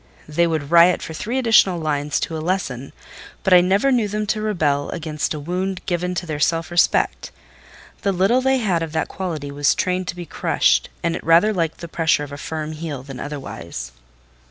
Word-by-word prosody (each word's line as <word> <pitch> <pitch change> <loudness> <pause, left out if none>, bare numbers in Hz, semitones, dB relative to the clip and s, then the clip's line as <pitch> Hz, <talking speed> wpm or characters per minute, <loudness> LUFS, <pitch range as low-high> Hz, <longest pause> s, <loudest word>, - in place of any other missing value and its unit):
They 170 +3 +2
would 155 -3 -2
riot 170 +1 +6
for 160 - -6
three 220 +10 -3
additional 220 -8 +4
lines 150 -2 -1
to 165 - -3
a 155 - -4
lesson; 155 -7 -2 0.5
but 190 - +3
I 180 - +8
never 195 +9 +2
knew 240 -5 +2
them 210 +1 -2
rebel 160 -10 0
against 155 -2 -3
a - - -5
wound 180 +4 -3
given 180 0 -1
to 175 +1 -3
their 155 -3 -4
self 165 +3 0
respect: 175 -1 +2 0.7
the 200 - +1
little 195 +7 +2
they 265 +1 +2
had 190 -9 0
of 160 -1 -4
that 160 - -1
quality 155 -7 -4
was 145 0 +2
trained 185 0 -1
to 180 - -3
be 175 -1 -7
crushed, - - +1
and 170 -1 0
it - - -6
rather 170 +7 +4
liked 165 -4 -2
the 170 - -6
pressure 160 -3 +1
of 145 - -8
a 145 - -7
firm 155 0 -4
heel 155 -4 -6
than 135 -2 -9
otherwise. 85 - -6
170 Hz, 200 wpm, -21 LUFS, 150-185 Hz, 0.7 s, I